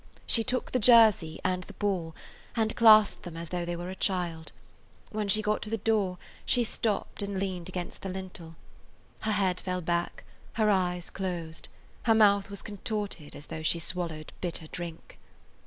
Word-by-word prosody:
She 230 - +3
took 250 +3 -2
the 255 - +2
jersey 215 -9 +6
and 185 0 0
the 205 - -11
ball, 185 -5 -2 0.4
and 220 -2 0
clasped 215 -2 +7
them 170 -2 -8
as 165 -1 -6
though 175 -1 -2
they 175 0 -2
were 175 +2 -5
a - - -6
child. 175 -4 -1 0.6
When 215 -1 -2
she 215 +2 +3
got 210 0 +1
to 210 - -5
the 225 - 0
door 205 -4 +1 0.3
she 245 - +3
stopped 215 -3 -2
and 200 -1 -3
leaned 185 -3 -3
against 180 -1 -5
the 195 - -4
lintel. 185 -3 -7 0.6
Her 215 - -1
head 190 -3 +1
fell 180 -1 -3
back; 170 +1 -1 0.3
her 215 -1 +3
eyes 180 -2 0
closed; 170 -4 -4 0.4
her 225 -2 +5
mouth 200 -2 +5
was 200 -1 -7
contorted 205 -6 -4
as 145 - -8
though 160 - -6
she 155 +2 +2
swallowed 165 -2 -4
bitter 170 -3 -3
drink. 170 0 -6
185 Hz, 175 wpm, -29 LUFS, 175-210 Hz, 0.6 s, clasped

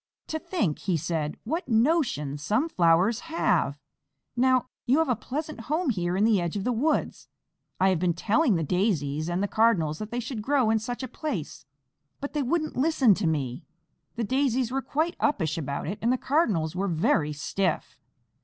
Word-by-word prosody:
"To 315 - -2
think," 300 - -1
he 180 -4 0
said, 155 -1 -2
"what 315 +5 -3
notions 225 - +1
some 235 - +1
flowers 180 - +3
have! 320 - 0 0.6
Now, 255 0 +3 0.2
you 260 +4 +4
have 320 -3 +2
a 250 - +3
pleasant 300 +6 -5
home 310 -1 +1
here 180 -3 -1
in 200 - +2
the 215 -4 +4
edge 170 +3 -2
of 195 - -3
the 250 - 0
woods. 275 +7 -1 0.5
I 190 - +4
have 185 -3 +1
been 175 -1 +1
telling 225 - +2
the 165 - 0
Daisies 155 -4 0
and 175 +3 -1
the - - +1
Cardinals 195 -9 +2
that 215 - -5
they 240 +2 -3
should 240 -2 -4
grow 260 -1 +2
in 220 - +2
such 245 +4 -5
a - - -3
place, 215 - -5 0.5
but 285 - -5
they 300 - 0
wouldn't 310 +4 -1
listen 265 -5 +4
to 190 -2 -1
me. 145 -1 -2 0.5
The 235 - -2
Daisies 260 0 +1
were 270 +1 -1
quite 315 +6 -1
uppish 165 - +1
about 140 -4 -3
it, 200 +6 -4
and 235 - +2
the 255 - +2
Cardinals 210 - +1
were 195 +2 -1
very 160 -3 +1
stiff." 165 +4 -2
220 Hz, 190 wpm, -27 LUFS, 165-265 Hz, 0.6 s, you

